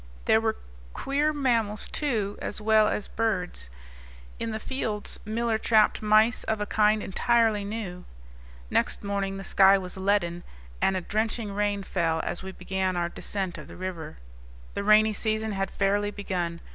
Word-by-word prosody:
There 220 - +4
were 220 -1 0 0.4
queer 290 +3 0
mammals, 230 -8 0
too, 220 -9 -1
as - - -4
well 215 0 +4
as 210 - -2
birds. 180 - -2 0.7
In 230 - -2
the 220 - -3
fields 220 -5 -1
Miller 225 +1 0
trapped 220 -2 +3
mice 215 +3 +4
of 220 -1 -1
a 210 - -1
kind 215 0 +2
entirely 225 0 +2
new. 200 -4 -5 0.7
Next - - 0
morning 200 -1 -2
the 195 - -6
sky 195 0 +6
was 185 -1 -6
leaden, 190 -3 0 0.4
and 190 0 +2
a - - -2
drenching 215 +2 -1
rain 205 -1 0
fell 165 -4 0
as - - -3
we 190 - -6
began 190 -1 -2
our 170 0 0
descent 190 0 -4
of - - -10
the - - -11
river. 175 - -6 0.6
The 200 - -3
rainy 215 +1 +5
season 220 +1 -1
had 195 -1 -2
fairly 205 +1 +1
begun. 180 -5 -3
205 Hz, 160 wpm, -27 LUFS, 190-220 Hz, 0.7 s, sky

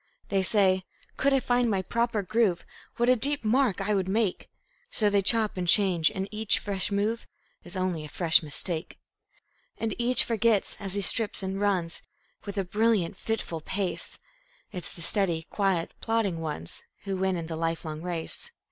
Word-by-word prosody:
They 195 -1 +2
say: 190 -1 +3 0.3
"Could 280 - +2
I 270 - +4
find 245 -1 +1
my 195 -3 0
proper 235 0 0
groove, 200 -3 +1 0.3
What 240 - +2
a 255 - +6
deep 280 +4 +1
mark 235 -3 +2
I 200 +2 0
would 190 -2 0
make!" 210 -1 0 0.4
So 210 - +2
they 200 -1 +3
chop 215 0 +3
and 180 -1 -2
change, 180 -4 +5
and 190 0 -4
each 215 0 +1
fresh 200 -1 -2
move 210 +3 -1 0.4
Is 175 - -8
only 185 -4 -1
a 150 - -8
fresh 165 +1 +3
mistake. 160 +2 0 0.8
And 225 -2 -2
each 245 +1 +5
forgets, 225 -2 +1
as 195 -1 -4
he 200 - 0
strips 210 +1 -1
and 190 +1 -3
runs 185 -5 0 0.4
With 200 -1 -6
a 195 - +1
brilliant, 210 -1 +1
fitful 190 -6 -3
pace, 190 +2 -4 0.5
It's 180 -4 -6
the 170 - -8
steady, 175 -4 +1
quiet, 190 -5 0
plodding 225 -7 0
ones 150 - -4 0.2
Who 195 -1 -3
win 190 -1 0
in 165 - -4
the 160 0 -5
lifelong 160 -1 -3
race. 175 - -4
195 Hz, 175 wpm, -27 LUFS, 175-220 Hz, 0.8 s, a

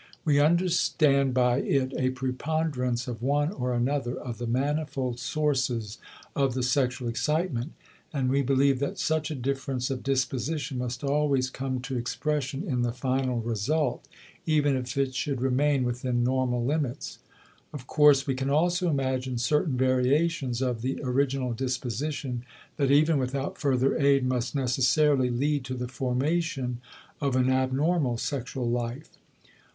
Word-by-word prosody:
We 145 -3 +4
understand 150 -4 +3
by 125 -1 +3
it 135 -1 0
a 130 - +1
preponderance 130 -1 -2
of 120 -2 -5
one 145 +4 +1
or 125 -8 -2
another 125 0 0
of 120 -2 -6
the 120 - -3
manifold 135 -1 -1
sources 125 -6 -1 0.4
of 135 -3 +1
the 130 - -1
sexual 125 -1 0
excitement, 150 +2 -1 0.4
and 135 -4 -1
we 135 +2 +2
believe 135 0 +2
that 140 - -2
such 155 -1 0
a 155 - -3
difference 135 0 -2
of 130 - -3
disposition 135 +2 -1
must 125 +2 -4
always 140 -2 +1
come 130 -1 -3
to 125 +1 -4
expression 140 +3 -2
in 130 -10 -1
the 120 -1 0
final 130 0 -1
result, 120 +8 -1 0.4
even 145 -3 +3
if 125 0 -4
it 135 -1 +1
should 135 0 -2
remain 135 +2 +2
within 125 0 -1
normal 125 -1 +1
limits. 145 -1 -2 0.5
Of 135 -4 -8
course, 145 -1 +5
we 135 - 0
can 135 +1 -2
also 175 +5 +2
imagine 130 -3 -1
certain 145 +3 +1
variations 130 +1 +1
of 125 -3 -1
the 130 +3 -2
original 130 -1 0
disposition 130 +1 -3 0.3
that 140 -2 +1
even 150 +2 +4
without 135 +1 -3
further 135 -1 +2
aid 140 -2 +3
must 125 +1 -1
necessarily 130 +1 +3
lead 140 +3 0
to 130 0 -4
the 125 0 -4
formation 130 0 -1 0.4
of 140 -3 0
an 130 0 +3
abnormal 130 +1 +1
sexual 130 -1 -3
life. 120 +3 -3
130 Hz, 145 wpm, -27 LUFS, 125-145 Hz, 0.5 s, course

